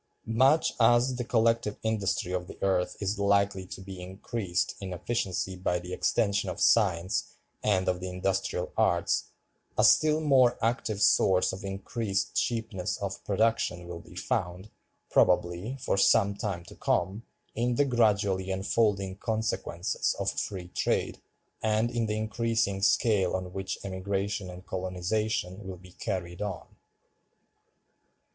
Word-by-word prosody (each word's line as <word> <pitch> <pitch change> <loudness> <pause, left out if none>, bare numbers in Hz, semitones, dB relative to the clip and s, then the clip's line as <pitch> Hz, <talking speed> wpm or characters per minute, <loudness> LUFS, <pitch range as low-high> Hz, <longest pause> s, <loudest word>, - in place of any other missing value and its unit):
Much 130 +8 +3
as 120 +2 +4
the 125 - -2
collective 115 -2 +1
industry 105 -3 0
of 90 -1 -2
the - - -10
earth 95 -2 +1
is 100 +1 -2
likely 100 -2 +2
to - - -8
be 95 -1 -8
increased 95 0 -2
in 95 -2 -4
efficiency 95 -1 -2
by 90 -1 0
the 90 +1 -7
extension 100 +3 +1
of - - -5
science 95 -4 +2 0.3
and 95 -3 +1
of 90 -1 +1
the 90 +1 -5
industrial 95 +1 -1
arts, - - +2 0.5
a - - +4
still 155 0 +5
more 135 -5 +4
active 115 -2 -1
source 95 -1 +4
of 95 +3 -7
increased 100 +1 -2
cheapness 110 -6 -1
of - - -5
production 110 -6 +1
will 85 -1 -6
be - - -15
found, 90 +4 -3 0.4
probably, 90 +10 +2
for 110 - 0
some 100 +1 +4
time 100 -4 -4
to - - -12
come, 100 +4 0 0.3
in 120 +2 0
the 145 - +3
gradually 100 -6 +2
unfolding 95 0 0
consequences 110 -5 -1
of - - 0
Free 90 -3 -4
Trade, - - -1 0.4
and 110 +2 +1
in 115 -2 0
the 105 0 -1
increasing 110 -2 0
scale 100 -3 +3
on 90 -1 -4
which 95 0 -3
Emigration 100 +1 -2
and 90 0 -10
Colonization 95 +2 -2
will 95 -1 -6
be 90 +1 -15
carried 90 -2 -4
on. 100 -6 -4
100 Hz, 140 wpm, -28 LUFS, 95-110 Hz, 0.5 s, still